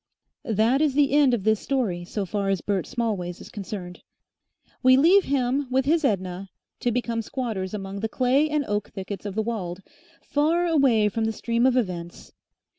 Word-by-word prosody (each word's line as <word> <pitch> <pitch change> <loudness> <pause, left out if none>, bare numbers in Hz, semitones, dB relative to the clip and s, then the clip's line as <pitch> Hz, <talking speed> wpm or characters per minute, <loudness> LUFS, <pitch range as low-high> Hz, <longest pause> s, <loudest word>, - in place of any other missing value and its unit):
That 225 +6 +2
is 295 -4 +2
the 285 -1 +3
end 280 -3 +4
of 205 - -5
this 220 0 +2
story 220 -11 -1
so 200 +2 -3
far 200 +1 -2
as 195 -2 0
Bert 200 -3 -1
Smallways 205 -8 -3
is - - -11
concerned. 190 -3 -7 0.8
We 255 0 +6
leave 360 +8 +5
him 270 0 0
with 260 +1 +1
his 320 +3 +2
Edna 190 -5 -1 0.3
to 245 - 0
become 235 -1 -1
squatters 220 -6 -4
among 195 -1 -5
the 220 +2 -2
clay 265 +6 +2
and 300 -2 0
oak 205 0 -2
thickets 195 +1 -6
of 195 - -6
the 220 - 0
Weald, 195 -5 -4 0.4
far 320 +4 +1
away 270 -10 +3
from 220 +2 -1
the 220 - 0
stream 235 +3 +1
of 260 -1 +2
events. 175 -7 -4
225 Hz, 185 wpm, -25 LUFS, 195-265 Hz, 0.8 s, We